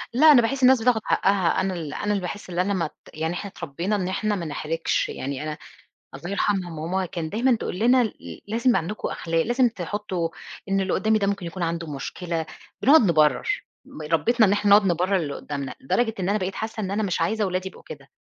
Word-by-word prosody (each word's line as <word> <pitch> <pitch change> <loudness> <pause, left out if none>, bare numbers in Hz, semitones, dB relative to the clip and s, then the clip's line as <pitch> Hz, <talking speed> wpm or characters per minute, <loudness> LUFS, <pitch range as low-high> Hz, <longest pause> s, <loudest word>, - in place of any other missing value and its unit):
لا، 305 +5 +8
أنا 265 -5 +7
باحس 260 +4 -1
الناس 255 -1 +6
بتاخد 235 -1 +3
حقها 190 -3 +2
أنا 190 0 -1
ال 160 -4 -5
أنا 205 - -2
اللي 200 -2 0
باحس 185 +2 -6
اللي 175 +1 0
أنا 200 +2 0
مت 170 -5 -2 0.2
يعني 160 +2 -2
إحنا 200 +3 -5
اتربينا 170 +6 -3
إن 190 -3 -1
إحنا 210 +3 -1
ما 175 - -4
نحرِجش، 160 +2 -1
يعني 140 +1 -4
أنا 155 0 -4 0.6
الله 175 - -7
يرحمها 200 -2 0
ماما 170 +4 -2
كان 170 -3 -4
دايمًا 240 +5 +2
تقول 180 - -5
لنا 245 +3 +4
ل 220 - -8
لازم 235 +4 +2
عندكم 185 +7 -3
أخلاق، 165 0 -1
لازم 245 +1 +3
تحُطّوا 190 -4 -3 0.4
إن 195 0 +1
اللي 190 -1 -1
قُدّامي 215 +2 +2
ده 200 - 0
ممكن 200 -3 -2
يكون 175 +1 -5
عنده 165 0 -2
مشكلة، 165 +4 -4 0.4
بنقعد 305 +4 +7
نبرّر، 155 - +2 0.2
م 155 - -10
ربِّتنا 200 - +3
إن 195 - +2
إحنا 205 0 +1
نقعد 205 0 +7
نبرّر 180 +3 +1
للي 145 -5 -3
قُدّامنا، 140 -2 -5
لدرجة 225 - 0
إن 185 - -1
أنا 205 +2 +2
بقيت 190 0 -3
حاسة 220 +1 -4
إن 190 -3 -3
أنا 205 +2 0
مش 190 -4 -1
عايزة 220 0 +1
ولادي 185 +1 -2
يبقوا - - -16
كده، 480 - -10
190 Hz, 215 wpm, -24 LUFS, 165-215 Hz, 0.6 s, لا